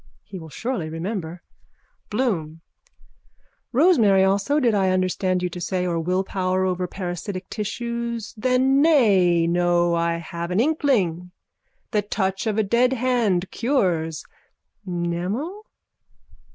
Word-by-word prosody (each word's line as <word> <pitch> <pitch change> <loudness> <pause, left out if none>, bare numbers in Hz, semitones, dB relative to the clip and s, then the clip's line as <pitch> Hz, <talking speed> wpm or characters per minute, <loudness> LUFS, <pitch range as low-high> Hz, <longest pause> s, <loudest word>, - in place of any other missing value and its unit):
_ - - -35 0.2
He 190 - -9
will 160 -1 -10
surely 220 - -3
remember. 170 0 -5 0.7
BLOOM: 180 -9 -2 1.1
Rosemary 235 - +4
also 200 +10 +2
did 240 -5 +2
I 195 -2 +2
understand 185 0 0
you 180 - 0
to 180 - -7
say 180 +1 -1
or 170 -2 -1
willpower 185 +2 0
over 180 -1 -1
parasitic 185 +1 -5
tissues. 235 +1 -4
Then 255 +4 +2
nay 195 - +4
no 175 0 +2
I 170 0 0
have 170 +1 -6
an 180 +3 0
inkling. 225 - +1 0.6
The 210 -3 +2
touch 195 0 -2
of 215 -1 0
a 220 - +3
deadhand 235 -4 +1
cures. 180 - 0 0.6
Mnemo? 185 - -3
190 Hz, 120 wpm, -23 LUFS, 175-235 Hz, 1.1 s, Rosemary